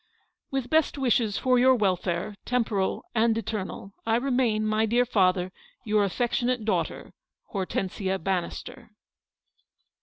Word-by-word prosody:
" - - -52
"With 270 -2 -2
best 315 -2 +3
wishes 235 -5 +1
for 255 -1 +3
your 260 +1 +6
welfare, 190 -2 0
temporal 225 -6 0
and 225 -1 +3
eternal, 200 -2 -4
" - - -41
I 225 - +3
remain, 245 -4 +1
my 215 +1 +2
dear 240 +3 +3
father, 185 -5 +2 0.3
"Your 210 -1 +3
affectionate 240 +3 0
daughter, 220 - -2 0.2
" - - -33
Hortexsia 190 0 -2
Bannister." 190 +5 -4
220 Hz, 130 wpm, -27 LUFS, 195-245 Hz, 0.3 s, your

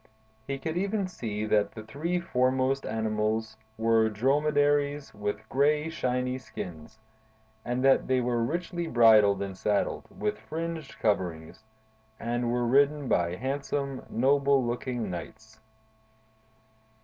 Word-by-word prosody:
He 140 - -2
could 160 +5 -4
even 200 +1 0
see 110 - -4
that 105 -1 +1
the 110 - -8
three 155 +11 -2
foremost 130 -3 +1
animals 110 0 -1 0.2
were 110 0 +3
dromedaries, 145 +4 +1
with 105 +1 -4
gray, 150 +4 +2
shiny 125 -4 -1
skins; 90 -5 -8 0.7
and 125 +2 -1
that 135 - +4
they 130 0 +2
were 120 -1 0
richly 175 +5 -2
bridled 110 -6 +5
and 95 -1 -5
saddled, 100 +1 -1
with 105 0 -3
fringed 165 -2 -5
coverings, 90 -2 -2 0.6
and 120 0 -1
were 120 0 0
ridden 140 +3 +3
by 85 -5 +1
handsome, 140 +3 -3
noble 140 +2 +3
looking 120 -3 -3
knights. 110 +7 -9
125 Hz, 120 wpm, -28 LUFS, 110-140 Hz, 0.7 s, bridled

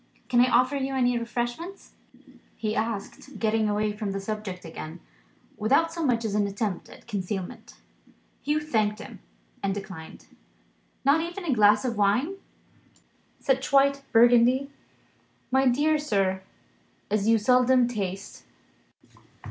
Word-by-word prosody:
Can 240 -1 +4
I 250 - +4
offer 255 +4 +3
you 270 0 -2
any 245 -1 +2
refreshment?" 240 +10 -5 0.7
he 215 -1 -2
asked, 225 +3 -4
getting 220 0 +1
away 210 0 0
from 205 -2 -4
the 195 - -3
subject 195 -3 -5
again, 160 +1 -8 0.6
without 280 +10 +2
so 335 -1 -3
much 235 -5 +1
as 210 - -2
an 205 -1 +1
attempt 200 -1 -3
at - - -15
concealment. 195 -3 -5 0.7
Hugh 300 +2 0
thanked 215 -8 0
him, 220 - -10 0.4
and 195 -1 -1
declined. 190 -5 -9 0.8
"Not 285 +4 +4
even 345 +3 -5
a 300 - +1
glass 210 0 +4
of 235 -3 -2
wine? 245 - +1 1.0
Such 270 -1 0
white 275 0 +4
Burgundy, 245 +4 +5 0.8
my 265 +1 +3
dear 300 +5 +2
sir, 195 -9 0 0.7
as 210 0 +1
you 225 0 +5
seldom 250 +2 +4
taste." 200 -4 -5
230 Hz, 130 wpm, -26 LUFS, 205-265 Hz, 1.0 s, Burgundy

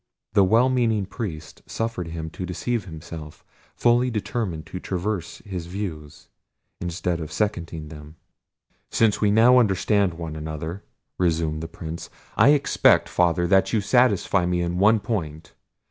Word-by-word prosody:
The 100 -2 +5
well 115 +7 +4
meaning 115 -6 +1
priest 90 -8 -7
suffered 115 -6 -3
him 80 -1 -6
to 90 - -6
deceive 100 +5 -2
himself, 80 -2 -9 0.3
fully 120 +1 +3
determined 105 - -3
to 90 - -7
traverse 95 -1 -4
his 90 -4 -5
views, 85 -6 -6 0.5
instead 85 0 -2
of 80 -2 -6
seconding 85 -7 -3
them. 75 0 -11 0.7
"Since 110 -3 +2
we 105 - +4
now 115 +4 +6
understand 100 -3 +2
one 80 -2 -6
another," 80 +4 -5 0.4
resumed 80 -3 0
the 80 - -5
Prince, 80 0 -7 0.3
"I 115 +6 +6
expect, 145 -1 +4
Father, 85 0 +2
that 95 +2 +3
you 110 - +3
satisfy 100 -4 +2
me 90 0 0
in 85 +1 -2
one 105 +2 +4
point. 85 -8 -4
90 Hz, 145 wpm, -24 LUFS, 80-105 Hz, 0.7 s, now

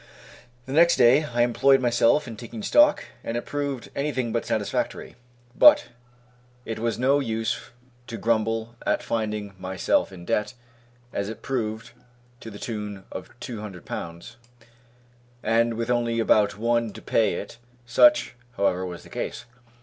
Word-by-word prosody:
The 130 - -8
next 170 +3 +6
day 130 +5 +5
I 120 -4 +1
employed 135 +3 +4
myself 120 +3 +3
in 115 - -7
taking 120 - -8
stock, 295 +9 +4 0.2
and 115 - -3
it 120 - -4
proved 140 -4 -4
anything 130 -5 -1
but 115 -3 -2
satisfactory; - - -2 0.4
but 290 - +7 0.8
it 110 -1 -4
was 115 0 -1
no 135 +4 +3
use 115 -3 -2 0.4
to 115 - -6
grumble 115 0 0
at - - 0
finding 105 -3 -3
myself 95 +1 0
in 90 -2 -11
debt, 105 +7 -1 0.6
as 100 0 -2
it 110 - -9
proved, 110 -4 -3 0.5
to 115 - -9
the 105 - -10
tune 105 -3 -6
of 95 - -7
two 115 -4 -6
hundred 95 -5 -9
pounds, 85 +8 -7 1.1
and 115 +1 +2
with 115 +1 -2
only 120 -1 0
about 105 -2 +3
one 115 -1 0
to - - -10
pay 110 -3 +2
it, 115 - -7 0.3
such, 300 - +4 0.2
however, 95 -2 +1
was 90 -4 -7
the - - -15
case. - - -5
115 Hz, 150 wpm, -25 LUFS, 105-125 Hz, 1.1 s, but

